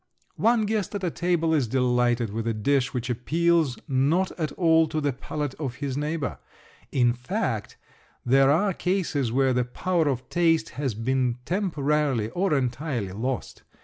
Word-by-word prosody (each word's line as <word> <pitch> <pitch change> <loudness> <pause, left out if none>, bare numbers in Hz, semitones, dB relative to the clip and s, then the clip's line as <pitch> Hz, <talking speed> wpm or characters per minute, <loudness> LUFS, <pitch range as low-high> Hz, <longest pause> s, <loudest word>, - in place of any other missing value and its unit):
One 230 -1 +3
guest 210 -2 -2
at 185 -4 -2
table 170 -2 +1
is 140 -6 +2
delighted 120 -2 +1
with 115 +1 -3
a 115 - 0
dish 135 +4 +1
which 125 -2 -3
appeals 155 +3 +1
not 150 +7 +2
at 155 -4 -3
all 160 -2 +4
to 155 0 -2
the 145 -2 0
palate 145 +2 -4
of 135 -6 -3
his 140 -1 -4
neighbor. 150 0 -2 0.5
In 120 -2 +3
fact 125 0 -3 0.5
there 135 +2 +5
are 185 +7 +3
cases 165 - -1
where 135 +1 +2
the 125 0 +2
power 165 +6 0
of 130 -2 -2
taste 165 -2 +2
has 130 -3 -3
been 125 +1 0
temporarily 150 - 0
or 190 +2 0
entirely 125 - -2
lost. 125 +6 -4
140 Hz, 155 wpm, -25 LUFS, 125-165 Hz, 0.5 s, there